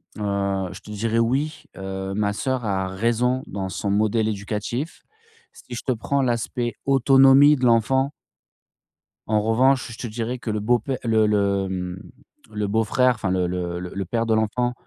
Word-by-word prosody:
heu, 100 -2 -1
je 95 - -9
te 105 - -11
dirais: 115 +2 0
«Oui, 145 +6 0
heu, 95 0 -5
ma 105 0 0
sœur 130 +1 -2
a 95 -2 -1
raison 120 +6 0
dans 95 -1 -4
son 100 +2 -3
modèle 110 +2 +1
éducatif». 110 +7 -4 0.5
Si 120 - -10
je - - -5
te 130 - +1
prends 135 +4 0
l'aspect 120 0 -1
autonomie 135 +2 +6
de 130 -3 -1
l'enfant 130 +4 +3 1.2
en 110 -1 +2
revanche, 125 +4 +2
je 115 - -9
te 120 - -5
dirais 115 +3 -4
que 115 -1 -6
le 105 -1 -1
beau-pè 120 +3 +1
le 110 -2 +3
le, 100 -2 +1
mmh, 90 0 -4 0.5
le 105 -1 -1
beau 110 +2 +1
frère, 125 +2 +3
enfin, 110 -3 -3
le 90 -1 +1
le 90 -1 -3
le 90 - -6
le 100 0 -3
père 115 +5 -1
de 115 - +1
l'enfant 120 +3 0
110 Hz, 180 wpm, -23 LUFS, 100-125 Hz, 1.2 s, autonomie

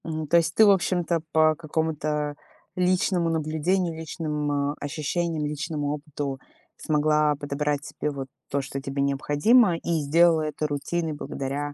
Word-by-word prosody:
М, 155 -1 -3
то 170 - +4
есть 160 -1 +1
ты, 220 - +7
в 205 - +7
общем-то, 175 -3 +1
по 155 0 +4
какому-то 150 -1 -2 0.4
личному 180 -1 +1
наблюдению, 165 +3 0
личным, 150 -3 -2
э, - - -4
ощущениям, 155 +2 -2
личному 150 0 -2
опыту 145 -2 -5 0.4
смогла 150 0 +2
подобрать 145 +1 -2
себе 150 - -3
вот 135 -2 -6 0.2
то, 140 - 0
что 135 0 -6
тебе 135 0 -3
необходимо, 150 - +3
и 165 -1 -1
сделала 165 +3 +4
это 155 0 -2
рутиной 155 +3 -2
благодаря, 145 0 -4
155 Hz, 145 wpm, -25 LUFS, 145-165 Hz, 0.4 s, ты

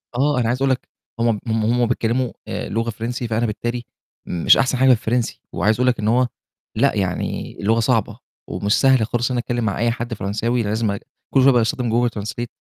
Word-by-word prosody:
آه، 140 +1 +2
أنا 115 - +1
عايز 125 +3 -1
أقول 135 - +3
لَك 130 - -2 0.3
هُم 115 -3 +1
هُم 110 -1 0
هم 120 +2 +2
بيتكلموا 120 +1 0 0.2
آآ - - -4
لغة 115 +1 -1
فرنسي، 120 +2 -4
فأنا 115 +1 0
بالتالي 120 +2 -3 0.4
مش 85 -2 +4
أحسن 130 0 +1
حاجة 130 +1 +4
في 130 - +8
الفرنسي، 120 +1 -1
وعايز 110 +1 +2
أقول 125 +3 +1
لَك 125 - +2
إن 105 - -1
هو 125 +3 +3 0.5
لأ، 130 +4 +2
يعني 95 -3 -2
اللغة 110 +3 +2
صعبة، 115 -1 0 0.3
ومش 100 +1 0
سهل 130 -4 +4
خااص 120 +2 -1
إن - - 0
أنا - - +1
أتكلم 120 0 -2
مع 100 - -1
أي 120 +1 +2
حدّ 120 0 -4
فرنساوي 115 +4 -1
لازم 110 +1 0
أج 100 - -4 0.3
كل 135 - +5
شوية 135 - +7
باستخدم 120 0 +1
google 120 +2 +2
translate 105 +4 -4
115 Hz, 215 wpm, -21 LUFS, 110-125 Hz, 0.5 s, في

